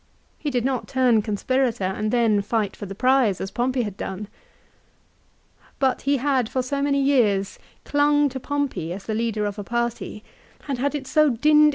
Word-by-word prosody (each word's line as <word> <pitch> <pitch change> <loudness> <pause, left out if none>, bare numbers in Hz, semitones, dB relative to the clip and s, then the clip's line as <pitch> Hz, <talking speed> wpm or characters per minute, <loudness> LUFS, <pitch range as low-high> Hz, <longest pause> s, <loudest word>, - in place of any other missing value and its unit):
He 300 - -2
did 250 -3 -1
not 260 -3 -1
turn 250 -4 +3
conspirator 230 +2 0
and 200 +3 -1
then 225 -3 +3
fight 210 -1 -1
for 205 - -7
the 195 - -7
prize 250 -4 +3
as 195 - -4
Pompey 250 +1 0
had 205 -3 -6
done. 200 +2 -5 1.5
But 265 -2 +1
he 280 - +4
had, 260 -3 +1
for 255 - -1
so 280 +2 -2
many 280 0 +2
years, 225 -9 +2 0.3
clung 290 0 +3
to 265 0 -6
Pompey 260 - -2
as 195 +1 -8
the 220 - -2
leader 220 -1 -1
of 205 0 -4
a - - -4
party, 235 -1 -3 0.4
had 275 -4 -3
had 285 +3 0
it 280 -2 -4
so 305 +3 +3
dinned 245 - -1
AFTER 225 - -18
THE - - +5
BATTLE. 300 0 +7
245 Hz, 200 wpm, -23 LUFS, 210-275 Hz, 1.5 s, BATTLE